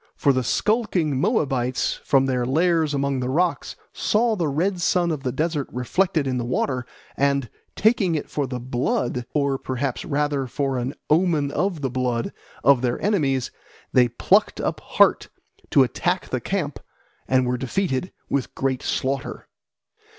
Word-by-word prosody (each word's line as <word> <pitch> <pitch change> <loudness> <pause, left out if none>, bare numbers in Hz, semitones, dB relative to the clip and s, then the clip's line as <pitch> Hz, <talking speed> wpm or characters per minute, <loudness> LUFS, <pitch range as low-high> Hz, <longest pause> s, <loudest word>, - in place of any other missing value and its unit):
For 140 - +3
the 130 0 0
skulking 180 - +1
Moabites 130 - 0
from 135 -1 +3
their 130 -2 0
lairs 160 +3 +2
among 140 -1 0
the 125 0 -2
rocks 170 +5 0 0.2
saw 225 +1 +1
the 170 -6 0
red 175 +6 0
sun 175 0 +2
of 150 -3 -3
the 130 -2 -2
desert 150 +1 -1
reflected 155 +5 0
in 130 -2 -1
the - - -2
water, 125 0 -1 0.3
and 140 -2 +1 0.3
taking 205 -6 +2
it 150 - -3
for 145 -2 -2
the 125 -1 -4
blood, 125 0 -1
or 140 -2 +1
perhaps 130 0 -3
rather 145 -2 -1
for 135 +1 -1
an 125 +3 -3 0.2
omen 155 -4 +2
of 180 -3 -1
the 135 -3 -1
blood, 125 -2 -1 0.3
of 135 -1 +5
their 125 -2 0
enemies, 140 - 0 0.4
they 125 -1 +5
plucked 120 - +2
up - - -2
heart - - +3 0.4
to 135 - +6
attack 175 +8 -1
the 130 - -2
camp 165 -8 -2 0.5
and 130 -1 +3
were 125 0 0
defeated 135 +4 -1 0.2
with 140 -3 -2
great 135 -1 -1
slaughter. 135 0 -2
140 Hz, 160 wpm, -23 LUFS, 130-165 Hz, 0.5 s, to